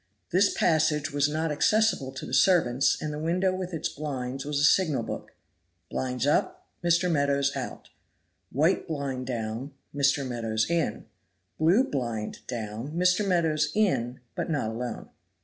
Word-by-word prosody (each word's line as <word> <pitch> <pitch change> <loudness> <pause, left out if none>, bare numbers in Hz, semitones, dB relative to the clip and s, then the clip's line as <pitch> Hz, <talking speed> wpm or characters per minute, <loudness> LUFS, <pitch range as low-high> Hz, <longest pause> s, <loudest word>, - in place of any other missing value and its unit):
This 195 +3 +4
passage 155 -3 +2
was 145 0 +2
not 160 +1 -1
accessible 210 -3 +2
to 135 - -6
the - - -8
servants, 135 -9 +4
and 150 -1 -4
the 150 - -4
window 180 +4 +1
with 185 -1 -4
its 165 - -2
blinds 135 -2 -4
was 145 0 -2
a - - +1
signal 155 -6 +3
book. - - -7 0.6
Blinds 125 -1 -2
up, 145 - +1 0.2
Mr. 175 +1 +3
Meadows 140 -3 +1
out. - - -6 0.6
White 155 +7 +2
blind 140 -5 -3
down, 115 +2 -4 0.2
Mr. 140 -1 +2
Meadows 115 -3 -1
in. 170 -2 -1 0.5
Blue 175 +11 +5
blind 120 - -3
down, 115 +3 -5
Mr. 180 +4 +3
Meadows 160 -5 +1
in, 130 - +1
but - - -3
not 145 -9 -1
alone. 120 0 -5
145 Hz, 150 wpm, -27 LUFS, 125-170 Hz, 0.6 s, Blue